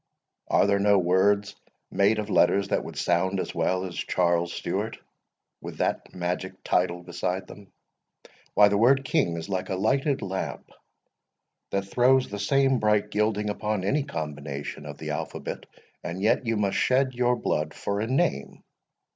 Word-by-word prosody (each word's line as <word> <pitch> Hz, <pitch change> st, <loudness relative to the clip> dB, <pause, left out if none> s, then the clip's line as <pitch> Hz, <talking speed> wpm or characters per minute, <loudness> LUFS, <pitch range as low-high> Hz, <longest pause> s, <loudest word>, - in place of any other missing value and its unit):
are -, -, +3 dB
there 100 Hz, 0 st, +2 dB
no 100 Hz, 0 st, +4 dB
words 95 Hz, +3 st, +2 dB, 0.4 s
made 100 Hz, +2 st, +3 dB
of 105 Hz, -1 st, -3 dB
letters 100 Hz, 0 st, +3 dB
that -, -, 0 dB
would -, -, -9 dB
sound 95 Hz, +2 st, +1 dB
as -, -, -4 dB
well 95 Hz, 0 st, 0 dB
as 90 Hz, -, -6 dB
Charles 85 Hz, -1 st, 0 dB
Stewart, -, -, -3 dB, 0.6 s
with -, -, -8 dB
that -, -, -1 dB
magic 90 Hz, +1 st, -4 dB
title 90 Hz, -1 st, 0 dB
beside 90 Hz, +1 st, -3 dB
them? 100 Hz, 0 st, -14 dB, 0.8 s
Why, 105 Hz, 0 st, +7 dB
the 100 Hz, 0 st, +1 dB
word 135 Hz, +4 st, +4 dB
King 85 Hz, -9 st, +1 dB
is 80 Hz, -, -6 dB
like 95 Hz, -2 st, -3 dB
a 95 Hz, -, -1 dB
lighted 135 Hz, +8 st, +1 dB
lamp, 95 Hz, -1 st, -5 dB, 1.0 s
that 100 Hz, 0 st, -1 dB
throws 125 Hz, +5 st, +3 dB
the 105 Hz, -, -5 dB
same 135 Hz, +4 st, +2 dB
bright 105 Hz, -1 st, +1 dB
gilding 105 Hz, 0 st, 0 dB
upon 105 Hz, -1 st, -2 dB
any 140 Hz, +10 st, +1 dB
combination 75 Hz, -, -6 dB
of -, -, -8 dB
the -, -, -5 dB
alphabet, -, -, -5 dB, 0.4 s
and 85 Hz, +2 st, -5 dB
yet 110 Hz, +4 st, +1 dB
you 115 Hz, -1 st, +1 dB
must 100 Hz, -2 st, 0 dB
shed 130 Hz, 0 st, +2 dB
your 125 Hz, 0 st, +2 dB
blood 75 Hz, -8 st, -2 dB
for 100 Hz, 0 st, -2 dB
a 110 Hz, -, -1 dB
name! 115 Hz, -, -1 dB
100 Hz, 165 wpm, -26 LUFS, 90-110 Hz, 1.0 s, Why